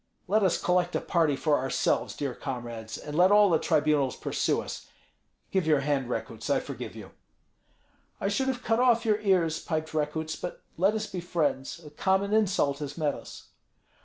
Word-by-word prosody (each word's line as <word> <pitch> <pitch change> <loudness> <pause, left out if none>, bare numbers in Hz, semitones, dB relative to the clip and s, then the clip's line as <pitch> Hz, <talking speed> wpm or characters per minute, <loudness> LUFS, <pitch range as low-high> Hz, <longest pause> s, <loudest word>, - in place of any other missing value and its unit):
Let 210 +4 +3
us 190 -4 +2
collect 180 0 +1
a - - +2
party 165 -5 +1
for 150 +1 +1
ourselves, 135 +1 0
dear 140 -3 -3
comrades, 120 -5 -6
and 150 - -7
let 180 +4 +5
all 205 -2 +6
the 160 - +4
tribunals 150 -4 +2
pursue - - 0
us. - - -7 0.6
Give 190 -4 +1
your 150 -3 +4
hand, 135 -3 0
Rekuts, - - -4
I - - +3
forgive - - -7
you." - - -10 1.1
"I - - -1
should 265 +7 0
have 255 -1 -2
cut 225 +1 +1
off 240 -2 +4
your 215 -1 +2
ears," 175 -6 +2
piped 160 -1 -3
Rekuts; 155 +1 -2
"but 180 - -7
let 195 +5 +2
us 215 0 -1
be 185 - -5
friends, 160 -4 -1
a 150 - -10
common 190 +6 +1
insult 185 -10 +2
has 145 0 -6
met 150 -3 +1
us." - - -11
165 Hz, 185 wpm, -28 LUFS, 145-195 Hz, 1.1 s, all